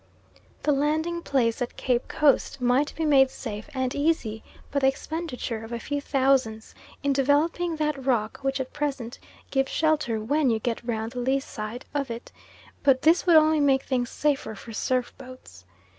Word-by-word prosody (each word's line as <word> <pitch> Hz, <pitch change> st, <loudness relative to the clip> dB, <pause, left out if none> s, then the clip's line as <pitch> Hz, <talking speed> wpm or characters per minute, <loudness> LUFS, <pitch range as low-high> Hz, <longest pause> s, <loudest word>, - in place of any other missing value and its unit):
The 300 Hz, -, +3 dB
landing 310 Hz, +4 st, 0 dB
place 250 Hz, -5 st, 0 dB
at 245 Hz, -, -3 dB
Cape 245 Hz, -1 st, 0 dB
Coast 280 Hz, -1 st, +2 dB
might 250 Hz, +4 st, +2 dB
be 320 Hz, -, -1 dB
made 270 Hz, -3 st, +5 dB
safe 220 Hz, 0 st, -7 dB
and 260 Hz, -2 st, -2 dB
easy 285 Hz, -8 st, 0 dB, 0.3 s
by 280 Hz, -, +1 dB
the 265 Hz, -, +3 dB
expenditure 270 Hz, -5 st, -3 dB
of 225 Hz, -, -9 dB
a 235 Hz, -, -2 dB
few 285 Hz, +4 st, -3 dB
thousands 260 Hz, -6 st, +1 dB, 0.3 s
in 280 Hz, 0 st, +2 dB
"developing" 305 Hz, +5 st, +1 dB
that 300 Hz, -3 st, -2 dB
rock 245 Hz, -1 st, 0 dB
which 270 Hz, 0 st, -1 dB
at 260 Hz, -1 st, -5 dB
present 275 Hz, -5 st, -3 dB, 0.3 s
gives 270 Hz, -1 st, +1 dB
shelter 300 Hz, -8 st, +1 dB
WHEN 280 Hz, +6 st, +1 dB
you 225 Hz, -, +2 dB
get 230 Hz, +1 st, -3 dB
round 225 Hz, -1 st, -3 dB
the 250 Hz, -, -5 dB
lee 265 Hz, +3 st, +1 dB
side 220 Hz, -2 st, -7 dB
of 280 Hz, -3 st, -1 dB
it, 230 Hz, +1 st, -7 dB, 0.5 s
but 270 Hz, -2 st, +3 dB
this 330 Hz, +4 st, +4 dB
would 340 Hz, -, +6 dB
only 310 Hz, 0 st, +5 dB
make 270 Hz, -2 st, +3 dB
things 245 Hz, -3 st, -1 dB
safer 285 Hz, -6 st, -1 dB
for 225 Hz, +3 st, -10 dB
surf 250 Hz, +2 st, -1 dB
boats. 255 Hz, -, -13 dB
270 Hz, 175 wpm, -26 LUFS, 240-295 Hz, 0.5 s, would